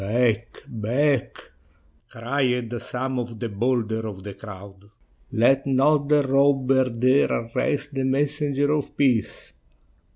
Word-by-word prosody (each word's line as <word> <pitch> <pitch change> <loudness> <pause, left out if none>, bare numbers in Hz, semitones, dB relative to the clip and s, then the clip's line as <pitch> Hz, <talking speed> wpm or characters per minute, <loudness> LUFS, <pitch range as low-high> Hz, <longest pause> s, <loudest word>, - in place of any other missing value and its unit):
"Back, 115 +2 0
back!" 125 +5 0 0.7
cried 125 -1 -1
some 130 +1 -3
of 115 -2 -6
the 115 - -3
bolder 110 0 -1
of 95 -3 -8
the 100 0 -7
crowd; 100 -1 -11 0.5
"let 135 +3 +3
not 140 +2 +2
the 150 -1 +4
robber 135 -1 +2
dare 130 +4 +2
arrest 140 +5 -2
the 135 -1 -2
Messenger 145 +1 0
of 150 -2 -2
Peace." 125 -6 0
130 Hz, 120 wpm, -24 LUFS, 115-140 Hz, 0.7 s, the